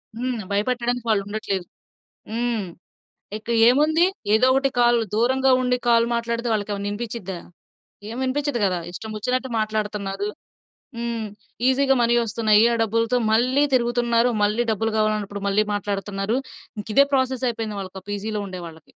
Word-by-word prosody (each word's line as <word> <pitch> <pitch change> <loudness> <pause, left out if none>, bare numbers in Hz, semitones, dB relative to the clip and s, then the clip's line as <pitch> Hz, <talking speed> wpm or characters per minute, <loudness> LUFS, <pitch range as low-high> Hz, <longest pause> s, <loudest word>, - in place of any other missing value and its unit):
హ్మ్. 245 -1 -2
భయపెట్టడానికి 240 +3 -1
వాళ్ళుండట్లేదు. 200 -2 -1 0.7
హ్మ్. 230 -3 -1 0.7
ఇక 220 - -13 0.2
ఏముంది? 310 +7 +4 0.3
ఏదో 250 +4 +5
ఒకటి 270 0 +2
కాల్ 240 0 +4 0.2
దూరంగా 260 +3 +3
ఉండి 250 0 +1
కాల్ 230 0 +5
మాట్లాడితే, 235 +1 -2
వాళ్ళకేమైనా 205 -1 -2
వినిపించిద్దా? 205 -4 -5 0.7
ఏం 230 - -6
వినిపించదు 280 -1 -1
కదా! 180 -2 0
ఇష్టం 220 +4 -7
వచ్చినట్టు 255 +4 -1
మాట్లాడుతున్నారు. 210 -2 -2 0.7
హ్మ్. 235 -2 -3 0.4
ఈజీగా 270 +1 +3
మనీ 235 0 +3
వస్తున్నాయి. 215 0 +3
ఆ - - 0
డబ్బులతో 230 +3 +1 0.2
మళ్ళీ 255 +5 +3
తిరుగుతున్నారు. 240 0 +2
మళ్ళీ 215 +3 +1
డబ్బులు 225 +1 -1
కావాలన్నప్పుడు 210 -2 -1
మళ్ళీ 210 +2 +2
మాట్లాడుతున్నారు. 200 +2 -2 0.4
ఇంక 210 - -5
ఇదే 280 - +8
ప్రాసెస్ 260 -1 0
అయిపోయింది. 220 -3 -4
వాళ్ళకి 190 0 -7
ఆ - - -60
పీజీ‌లో 210 +1 -3
ఉండేవాళ్ళకి. 170 -3 -10
230 Hz, 135 wpm, -23 LUFS, 205-245 Hz, 0.7 s, ఇదే